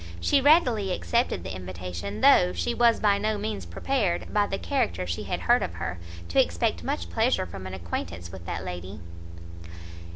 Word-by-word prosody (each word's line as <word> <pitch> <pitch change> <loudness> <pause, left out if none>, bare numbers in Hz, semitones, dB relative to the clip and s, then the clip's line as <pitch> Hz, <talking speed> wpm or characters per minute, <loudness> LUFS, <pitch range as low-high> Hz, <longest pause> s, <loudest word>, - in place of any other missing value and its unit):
She 275 - +3
readily 250 - +4
accepted 235 - 0
the - - -5
invitation, 90 +2 -6
though 90 0 +6
she 85 -1 -1
was 235 -1 +4
by 200 -1 +3
no 215 +1 0
means 210 0 -4
prepared, 220 -11 -1
by 205 -1 +3
the 195 - -2
character 90 - -1
she 85 -2 -4
had - - -3
heard - - +4
of 85 - -3
her, 85 0 -4 0.3
to - - +5
expect 85 0 -1
much 85 +1 -3
pleasure 85 - +1
from 95 +1 -8
an 95 - -6
acquaintance 85 -1 -5
with 90 -3 -10
that - - -4
lady. 90 +3 -6
95 Hz, 175 wpm, -26 LUFS, -, 0.3 s, though